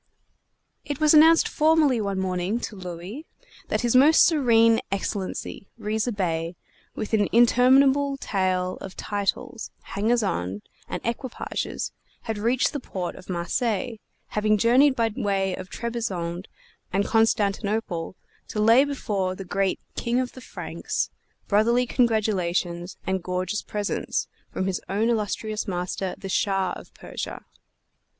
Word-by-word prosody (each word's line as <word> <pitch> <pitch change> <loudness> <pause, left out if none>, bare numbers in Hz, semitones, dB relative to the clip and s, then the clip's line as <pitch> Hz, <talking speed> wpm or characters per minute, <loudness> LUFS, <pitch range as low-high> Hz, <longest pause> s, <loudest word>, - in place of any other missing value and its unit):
It 290 -2 -4
was 310 0 +5
announced 320 +1 +7
formally, 305 -6 +3
one 200 -2 -2
morning, 185 +3 -1
to 215 - -5
Louis, 185 - -7 0.4
that - - 0
His 240 0 +1
Most 290 +5 +7
Serene 230 -8 +4
Excellency, 195 0 -3
Riza 220 +3 -1
Bey, 170 -4 -2 0.4
with 215 - -5
an 210 -2 +3
interminable 265 +4 +5
tail 185 -5 -1
of 190 - -8
titles, 220 +4 -2
hangers 220 +4 0
on 95 - -2 0.3
and - - -5
equipages, 235 +2 -3 0.3
had 220 -3 -3
reached 240 +4 +1
the 290 - -2
port 185 -8 -4
of 185 - -14
Marseilles, 215 +6 -1 0.3
having 215 0 +2
journeyed 255 +6 +5
by 230 -2 +1
way 195 -2 0
of 185 - -8
Trebizond 190 -7 -3 0.4
and 200 +2 +1
Constantinople, 210 -5 0 0.3
to 215 - -4
lay 230 +5 +6
before 205 -10 -2
the 195 - -7
great 195 0 0 0.2
"King 240 +1 0
of 255 -1 -2
the 255 - -12
Franks" - - -4 0.4
brotherly 235 +4 +3
congratulations 190 -7 0
and 190 0 -1
gorgeous 185 +3 -2
presents 205 -1 -2 0.2
from 185 - -2
his 190 -1 -1
own 210 +4 +1
illustrious 215 -1 -1
master, 180 0 -3
the 195 - -7
Shah 195 -1 +1
of - - -12
Persia. - - -7
210 Hz, 130 wpm, -25 LUFS, 190-240 Hz, 0.4 s, announced